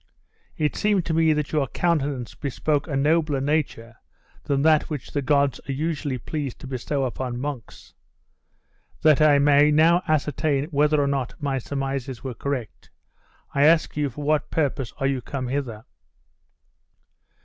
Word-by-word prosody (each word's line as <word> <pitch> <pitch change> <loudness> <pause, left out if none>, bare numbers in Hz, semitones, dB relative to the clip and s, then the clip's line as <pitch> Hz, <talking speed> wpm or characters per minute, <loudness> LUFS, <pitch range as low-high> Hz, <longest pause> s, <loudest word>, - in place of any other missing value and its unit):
It 150 -1 0
seemed 205 -4 +1
to 165 - -1
me 160 0 +3
that 150 -1 -1
your 150 -3 +1
countenance 145 -6 -1
bespoke 145 +2 -2
a 145 - -3
nobler 150 0 +2
nature 135 -6 -2 0.5
than 140 -1 0
that 155 -1 +4
which 150 -5 -6
the 145 - -1
gods 140 0 +1
are - - 0
usually 145 -2 -2
pleased 140 +1 -5
to - - -9
bestow 135 +2 -2
upon 125 0 -3
monks. 135 -4 -7 1.1
That 155 -1 +5
I 150 -2 +6
may 145 +1 +5
now 165 +4 +4
ascertain 150 -2 +1
whether 150 +1 +3
or 145 - +2
not 135 -3 -2
my 140 -2 -1
surmises 135 -2 -4
were 130 -2 -4
correct, 125 -2 -5 0.6
I 140 +1 +3
ask 165 0 +3
you 145 -1 0
for 145 +4 -8
what 150 -1 +1
purpose 140 -5 -1
are 135 - -2
you 135 -2 0
come 130 0 -5
hither? 125 -5 -4
140 Hz, 155 wpm, -24 LUFS, 135-150 Hz, 1.1 s, I